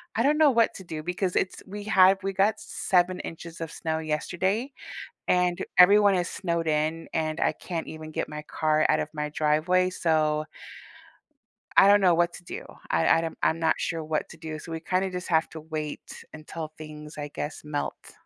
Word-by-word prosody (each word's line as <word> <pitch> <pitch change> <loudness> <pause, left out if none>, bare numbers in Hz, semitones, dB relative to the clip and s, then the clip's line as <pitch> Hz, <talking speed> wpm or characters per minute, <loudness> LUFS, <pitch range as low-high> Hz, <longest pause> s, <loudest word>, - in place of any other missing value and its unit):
I 230 - +2
don't 295 +2 +3
know 305 -3 +6
what 230 -2 +3
to 190 - -9
do 160 -3 -6
because 180 +1 -2
it's 185 - -1
we 205 +1 -7
had 190 -2 +5
we 195 0 -2
got 195 +3 +2
7 180 -1 +1
inches 165 0 -8
of 165 - -4
snow 160 -1 -2
yesterday, 190 - -1 0.6
and 180 -1 +2 0.2
everyone 200 +2 +7
is 180 0 0
snowed 170 -3 -2
in, 155 +2 0
and 155 -1 -1
I - - +2
can't 170 -3 -5
even 155 0 -8
get - - -3
my 150 0 -6
car 155 0 +1
out - - +3
of - - -2
my 150 0 -3
driveway, 155 +5 +2
so, 155 -3 +1 1.3
I 195 - +8
don't 205 0 +7
know 180 -3 +5
what 175 +1 +2
to 175 - -11
do, - - -7 0.3
I 80 0 +2
I - - +2
don't 165 -1 -5
I'm 160 - +2
not 160 -1 +3
sure 165 -1 -2
what 155 0 -2
to - - -11
do, 155 -1 -6
so 165 +2 -9
we 160 - -4
kinda 185 +2 0
just 180 0 -5
have 160 -1 +2
to 160 - -8
wait 155 -1 -6
until 155 +1 -7
things, 150 0 -9
I 145 - -4
guess, 150 +1 -6
melt. 150 -1 -5
165 Hz, 200 wpm, -26 LUFS, 155-185 Hz, 1.3 s, I